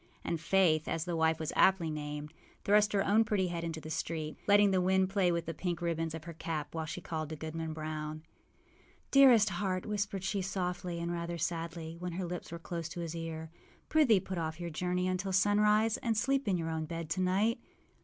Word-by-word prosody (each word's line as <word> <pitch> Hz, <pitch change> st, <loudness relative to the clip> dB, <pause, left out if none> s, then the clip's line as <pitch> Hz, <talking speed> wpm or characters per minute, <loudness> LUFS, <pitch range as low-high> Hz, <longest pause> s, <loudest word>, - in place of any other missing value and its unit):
And 170 Hz, -2 st, -2 dB
Faith, 165 Hz, -3 st, +3 dB
as 165 Hz, 0 st, -1 dB
the 175 Hz, -2 st, -2 dB
wife 160 Hz, 0 st, +2 dB
was 160 Hz, -, -3 dB
aptly 180 Hz, -4 st, +4 dB
named, 150 Hz, 0 st, -5 dB, 0.3 s
thrust 210 Hz, +1 st, +4 dB
her 195 Hz, -, +2 dB
own 215 Hz, +3 st, +5 dB
pretty 205 Hz, -4 st, 0 dB
head 170 Hz, -1 st, -3 dB
into 165 Hz, -1 st, -3 dB
the 155 Hz, 0 st, -8 dB
street, 155 Hz, -1 st, -3 dB
letting 205 Hz, 0 st, +6 dB
the 185 Hz, -1 st, +3 dB
wind 190 Hz, +1 st, +2 dB
play 195 Hz, -3 st, +3 dB
with 170 Hz, -1 st, -1 dB
the 165 Hz, -, -4 dB
pink 175 Hz, +1 st, -3 dB
ribbons 165 Hz, -1 st, -2 dB
of 160 Hz, -, -7 dB
her 170 Hz, 0 st, -8 dB
cap 155 Hz, -2 st, -4 dB
while 160 Hz, -1 st, -3 dB
she -, -, -5 dB
called 155 Hz, -3 st, -4 dB
to 160 Hz, -, -4 dB
Goodman 160 Hz, +1 st, -5 dB
Brown. 155 Hz, 0 st, -5 dB, 0.9 s
âDearest 255 Hz, -6 st, +7 dB
heart,â 185 Hz, 0 st, -2 dB
whispered 205 Hz, -2 st, -2 dB
she, 195 Hz, +1 st, -1 dB
softly 180 Hz, -2 st, -3 dB
and 170 Hz, 0 st, -2 dB
rather 170 Hz, 0 st, -3 dB
sadly, 165 Hz, 0 st, -3 dB
when 180 Hz, -1 st, -4 dB
her 180 Hz, +1 st, -3 dB
lips 175 Hz, -1 st, -6 dB
were 170 Hz, -, -4 dB
close 170 Hz, -1 st, -5 dB
to 175 Hz, 0 st, -6 dB
his 170 Hz, -1 st, -4 dB
ear, 160 Hz, -1 st, -5 dB, 0.4 s
âprithee 240 Hz, -, +4 dB
put 185 Hz, -2 st, -3 dB
off 160 Hz, 0 st, -3 dB
your 170 Hz, -1 st, -4 dB
journey 180 Hz, +3 st, -1 dB
until 185 Hz, +1 st, -1 dB
sunrise 210 Hz, +3 st, +3 dB
and 230 Hz, -4 st, -1 dB
sleep 270 Hz, +3 st, +1 dB
in 190 Hz, -3 st, +2 dB
your 165 Hz, -1 st, -2 dB
own 160 Hz, -1 st, -2 dB
bed 165 Hz, 0 st, -5 dB
to 185 Hz, -, 0 dB
night. 195 Hz, +5 st, +2 dB
175 Hz, 215 wpm, -32 LUFS, 160-195 Hz, 0.9 s, âDearest